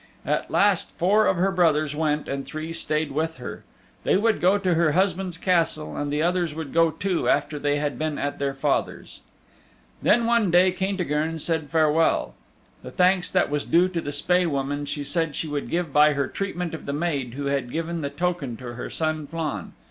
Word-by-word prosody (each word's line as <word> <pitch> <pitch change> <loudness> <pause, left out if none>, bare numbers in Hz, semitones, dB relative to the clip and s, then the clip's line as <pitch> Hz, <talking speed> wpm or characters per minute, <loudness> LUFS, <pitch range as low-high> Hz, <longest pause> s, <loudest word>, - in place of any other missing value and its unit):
At - - -1
last 200 -3 +2
four 205 +5 +3
of 190 - +2
her 190 +3 +2
brothers 155 -5 +2
went 150 -1 0
and 140 0 -3
three 155 +3 -6
stayed 155 -2 -1
with 160 +3 -1
her. 125 - -8 0.4
They - - +3
would 220 +1 +1
go 185 +3 +4
to 185 -3 +1
her 165 -2 +2
husband's 185 -1 0
Castle 165 -4 0
and 145 0 -3
the 150 +2 0
others 175 -3 0
would 160 -3 -6
go 165 0 +4
too 185 +2 -1
after 150 - +1
they 145 0 +1
had 145 -4 -2
been 155 -2 -2
at 145 0 -3
their 140 -1 -1
father's. 135 - -2 0.8
Then 235 +2 +3
one 230 -4 +3
day 180 +2 +5
Caintigern 175 -5 -1
said 160 -2 -2
farewell. 160 +1 +2 0.5
The - - -8
thanks 180 0 +2
that - - +1
was 145 -1 0
due 175 +2 +3
to 175 -2 -2
the 145 - -4
Spae 180 +5 +1
Woman, 145 0 -2
she 145 0 -3
said 160 +1 -1
she 160 - -3
would 145 -1 -3
give 170 -4 -2
by 150 0 +6
her 140 -1 -1
treatment 180 -2 -4
of 160 - -7
the 140 - -2
maid 145 -6 -2
who 140 0 -4
had 140 -3 -1
given 165 +2 -3
the 140 - -2
token 145 -5 -2
to 120 -1 -7
her 120 - -6
son 155 -2 -2
Flann. 160 -1 -4
160 Hz, 200 wpm, -24 LUFS, 145-180 Hz, 0.8 s, by